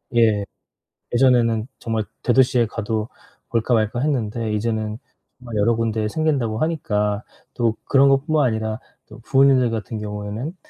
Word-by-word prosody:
예 110 -3 +3 0.7
예전에는 120 -3 +3
정말 110 -2 -2 0.2
대도시에 125 -1 +3
가도 110 0 -3 0.4
볼까 115 +1 0
말까 110 +1 +1
했는데 115 -6 -1
이제는 110 0 -2 0.6
여러 110 +3 +2
군데 110 -1 -1
생긴다고 130 -6 0
하니까 105 -10 -1 0.3
또 115 -2 +1
그런 140 0 +4
것 135 +1 +2
뿐만 155 -3 +2
아니라 110 -1 -2 0.3
또 - - -13
부모님들 130 +1 +4
같은 110 0 -4
경우에는 105 - -5
115 Hz, 305 characters per minute, -21 LUFS, 110-130 Hz, 0.7 s, 그런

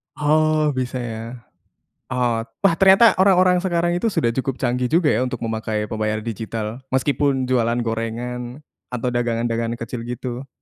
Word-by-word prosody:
Oh, 155 0 +2
bisa, 130 -1 -3
ya. 115 -3 -4 0.9
Ot 120 -3 -1 0.2
wah, 195 - +6
ternyata 195 +4 +7
orang-orang 185 -2 +5
sekarang 175 -2 0
itu 180 +6 0
sudah 120 - 0
cukup 135 +1 -2
canggih 125 -1 0
juga, 160 -1 +3
ya, 110 - +1
untuk 125 -1 -1
memakai 110 -1 -2
pembayaran 110 0 -2
digital 110 +1 -4
meskipun 135 0 +1
jualan 120 -2 +1
gorengan 120 +4 -4 0.2
atau 125 0 -3
dagangan-dagangan 115 -1 -1
kecil, 115 +1 -6
gitu. 125 +1 -5
125 Hz, 140 wpm, -21 LUFS, 115-150 Hz, 0.9 s, ternyata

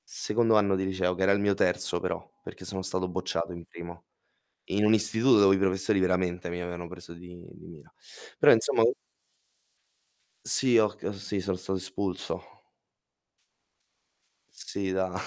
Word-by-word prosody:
Secondo 115 0 +1
anno 100 -2 +3
di 95 0 -1
liceo, 95 -1 -1
che 95 - -6
era 95 - +4
il 100 - +3
mio 100 0 +2
terzo 90 -2 0
però, - - -4
perché 90 - -11
sono 95 +1 -4
stato 95 0 -1
bocciato 90 -1 -3
in 85 -1 -10
primo. 85 +1 -11 0.6
In 100 +2 0
un 105 - +5
istituto 110 +3 +3
dove 95 -1 +6
i - - -1
professori 95 +2 +1
veramente 90 -1 0
mi 90 +1 -5
avevano 85 0 -6
preso 90 -1 -11
di 90 0 -13
di - - -15
mira. 75 -4 -15 0.5
Però - - +7
insomma - - +3
u - - +4 1.5
Sì, 130 -3 +4
ho 110 - +4
c 105 +1 -17
uhm, - - -2
sì, 100 +1 -4
sono 95 0 -2
stato 95 +1 -3
espulso. 95 0 -4 2.1
Sì, 95 -1 -5
da 95 -1 -1
95 Hz, 165 wpm, -28 LUFS, 90-100 Hz, 2.1 s, Però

